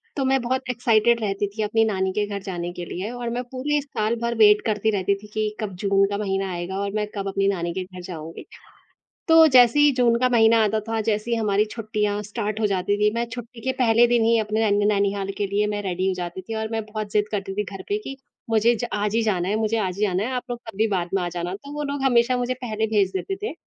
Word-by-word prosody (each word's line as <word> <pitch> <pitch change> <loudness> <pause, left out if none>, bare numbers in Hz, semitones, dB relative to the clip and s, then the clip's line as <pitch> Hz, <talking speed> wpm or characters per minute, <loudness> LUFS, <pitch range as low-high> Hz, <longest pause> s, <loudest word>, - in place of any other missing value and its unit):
तो 275 - -1
मैं 265 0 +3
बहुत 260 +1 -2
एक्साइटेड 235 -1 +2
रहती 200 -1 -1
थी 220 - -3
अपनी 225 +2 +2
नानी 190 -3 0
के 210 - 0
घर 200 -1 -5
जाने 175 -2 -4
के 175 -1 -6
लिए 190 +6 -5
और 245 -1 -4
मैं 245 +1 -3
पूरे 290 +3 0
साल 230 -5 -2
भर 235 0 -1
वेट 210 -1 +6
करती 215 0 +1
रहती 200 0 +1
थी 210 +1 -13
कि, 215 -1 -1
कब 205 -4 -4
जून 195 +1 +2
का 200 - -2
महीना 195 -2 -2
आएगा 175 +2 -4
और 200 0 -2
मैं 210 -1 -1
कब 195 -1 -3
अपनी 195 0 0
नानी 175 -3 -1
के 185 0 -3
घर 185 -1 -11
जाऊँगी। 165 -2 -8 0.8
तो 325 0 +8
जैसे 250 -1 +6
ही 295 0 +6
जून 235 -2 +3
का 255 0 +3
महीना 225 -2 +5
आता 215 +1 0
था, 225 0 -1
जैसे 215 +1 -1
ही 235 - +2
हमारी 210 -1 +2
छुट्टियाँ 210 -2 -2
स्टार्ट 215 0 -4
हो 215 - +3
जाती 195 +1 0
थी। 210 - +4
मैं 235 0 0
छुट्टी 240 -1 -8
के 260 - +1
पहले 230 +1 +5
दिन 240 -1 +2
ही 230 0 +4
अपने 215 0 0
नै 205 0 +2
नैनीहाल 200 -1 +1
के 205 - 0
लिए 205 +2 0
मैं 205 0 -2
रेडी 185 0 -2
हो 190 - 0
जाती 175 0 -5
थी 225 +4 -6
और 220 0 -2
मैं 225 -1 -2
बहुत 215 -1 -5
ज़िद 210 0 +1
करती 195 -1 -3
थी 210 +1 -1
घर 195 0 -8
पे 410 +1 0
कि, 270 -10 -8 0.3
मुझे 225 +2 +4
ज 240 - -3
आज 210 +1 -1
ही 230 - +3
जाना 190 -5 0
है, 210 - 0
मुझे 220 +1 0
आज 185 -3 -2
ही - - -2
जाना 185 0 0
है 240 - -2
आप 250 - -2
लोग 240 - -3
कभी 220 +1 0
बाद 180 -3 -1
में 195 - +1
आ 175 - -1
जाना। 175 +1 -4
तो 280 +8 -10
वो 295 0 -4
लोग 280 -1 -4
हमेशा 245 -1 +3
मुझे 245 +1 -1
पहले 220 -2 -1
भेज 205 -3 +2
देते 385 - -3
थे, 435 - -2
210 Hz, 265 wpm, -23 LUFS, 195-235 Hz, 0.8 s, तो